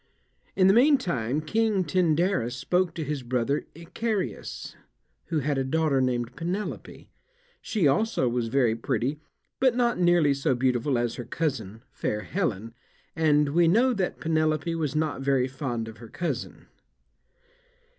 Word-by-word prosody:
In 185 - +4
the 190 - +6
meantime 175 - +2
King 215 +4 +1
Tyndarus 165 - +1
spoke 175 +7 0
to 160 - -3
his 150 -1 -3
brother 125 +3 -1
Icarius, 185 +5 -4 0.5
who 160 -3 0
had 140 0 0
a - - +1
daughter 145 0 +1
named 120 -2 -1
Penelope. 185 +5 -5 0.5
She 200 -9 +1
also 205 - +1
was 120 -1 -1
very 120 -2 +2
pretty, 125 +5 -2 0.4
but 260 -2 +3
not 240 -4 +1
nearly 175 -5 +4
so 135 -1 0
beautiful 125 +1 +1
as 120 -1 -1
her 125 - -5
cousin, 115 -6 -3
fair 105 -5 -2
Helen, 115 - -3 0.4
and 150 -2 +3
we 170 +3 +3
know 240 +9 +4
that 190 -5 -2
Penelope 155 0 0
was 155 -3 -2
not 155 -3 -1
very 135 -2 +2
fond 130 -4 -4
of 110 0 -10
her 115 -2 -11
cousin. 175 - -4
150 Hz, 145 wpm, -26 LUFS, 125-175 Hz, 0.5 s, the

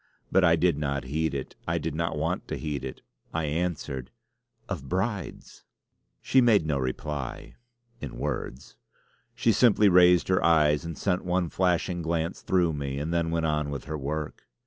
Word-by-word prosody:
But 95 - +4
I 85 -1 +6
did 85 -3 +2
not 70 -2 -1
heed 75 +2 -1
it. 65 - -5
I - - +1
did - - -3
not 85 0 -2
want 80 +4 -2
to - - -3
heed 75 -4 -4
it. 65 - -7 0.3
I 80 - 0
answered: 75 -5 -3 0.6
"Of 80 -10 -5
Brides!" 95 +1 -3 0.6
She 130 - +4
made 110 -8 +4
no 75 -3 0
reply 65 +1 -4 0.5
in - - -7
words. - - -5 0.6
She 115 -1 +3
simply 105 -1 +5
raised 90 -1 +6
her 95 - +2
eyes 75 -2 +4
and 85 -1 -6
sent 90 -2 0
one 90 -1 0
flashing 90 0 0
glance 85 +1 -2
through 90 -3 +2
me, 70 -2 -3
and 75 +4 -2
then 85 -1 +1
went 80 0 0
on 75 -2 0
with 70 -2 -5
her 80 - -5
work. 75 +1 -5
80 Hz, 170 wpm, -27 LUFS, 75-90 Hz, 0.6 s, I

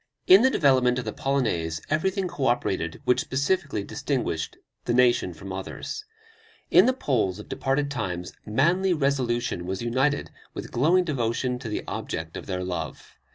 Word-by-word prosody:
In 190 +3 +8
the 260 - +5
development 130 - +3
of 125 - -3
the 110 - -3
Polonaise 90 - 0
everything 190 +4 +1
co 140 -6 -2
operated 95 -9 0
which 125 0 +3
specifically 140 - 0
distinguished 125 - -2 0.3
the 120 - +1
nation 120 -6 +4
from 95 +3 -8
others. 95 - -6 0.7
In - - +7
the - - +5
Poles 120 - 0
of 105 - -10
departed 140 +1 -1
times 90 -9 -3
manly 170 - +2
resolution 125 - 0
was 95 +3 -3
united 130 +5 0 0.2
with - - -6
glowing 165 +9 +3
devotion 125 -4 -1
to 115 - -6
the 105 - -3
object 80 0 -4
of - - -7
their 90 -2 -2
love. 90 -2 -6
125 Hz, 155 wpm, -26 LUFS, 100-145 Hz, 0.7 s, In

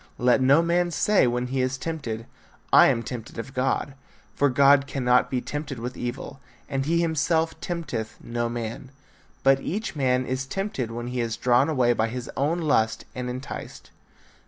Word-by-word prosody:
Let 125 +1 +3
no 140 +5 +5
man 175 +1 +1
say 195 -2 +3
when 125 +1 -1
he 130 +1 -1
is 130 0 -1
tempted, 130 -7 -4 0.5
I - - +9
am 115 - +1
tempted 115 0 -7
of 125 +3 -6
God; 135 +2 0 0.4
for 145 - +2
God 140 +1 +5
cannot 125 -3 +2
be 125 -2 -1
tempted 145 -1 -5
with 125 +2 -5
evil, 125 +3 -5 0.3
and 135 +1 -2
he 170 +1 +2
himself 160 0 0
tempteth 125 -11 -4
no 120 0 -3
man; 120 +2 -5 0.5
but 135 0 +5
each 205 +6 -4
man 130 -2 +1
is 130 +1 -3
tempted 195 - -3
when 120 +1 -5
he 125 0 -3
is 115 -1 -2
drawn 125 +4 +3
away 125 -5 +3
by 110 -1 0
his 125 +1 -6
own 155 +6 0
lust 115 -8 +1
and 125 -1 -4
enticed. 130 +2 -7
130 Hz, 175 wpm, -25 LUFS, 120-145 Hz, 0.5 s, I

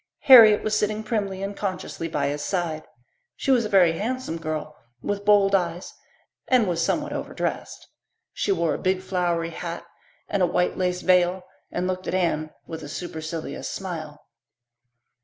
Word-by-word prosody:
Harriet 225 -6 +8
was 215 0 0
sitting 215 +1 0
primly 200 -4 -2
and 200 +1 -4
consciously 185 -4 -4
by 150 -3 -1
his 145 +1 -3
side; 170 -4 -2 0.5
she 275 - -1
was 245 -4 +3
a - - -3
very 185 -5 +5
handsome 235 -7 -3
girl 155 -1 -4 0.3
with 205 0 -2
bold 200 -1 +4
eyes 175 -2 -1 0.5
and 250 -5 +3
was 170 -2 0
somewhat - - -1
overdressed. - - -4 0.5
She 205 - -1
wore 170 -5 +1
a - - -4
big 185 0 0
flowery 175 -3 -1
hat 170 0 -6 0.4
and 200 - -1
a 180 - +4
white 180 +1 0
lace 180 -1 -1
veil 180 0 +3 0.3
and 180 - -2
looked 185 0 -3
at - - -1
Anne 160 -4 0 0.2
with 160 0 -7
a 145 - -8
supercilious 160 0 -5
smile. 160 -6 -6
180 Hz, 160 wpm, -24 LUFS, 165-200 Hz, 0.5 s, Harriet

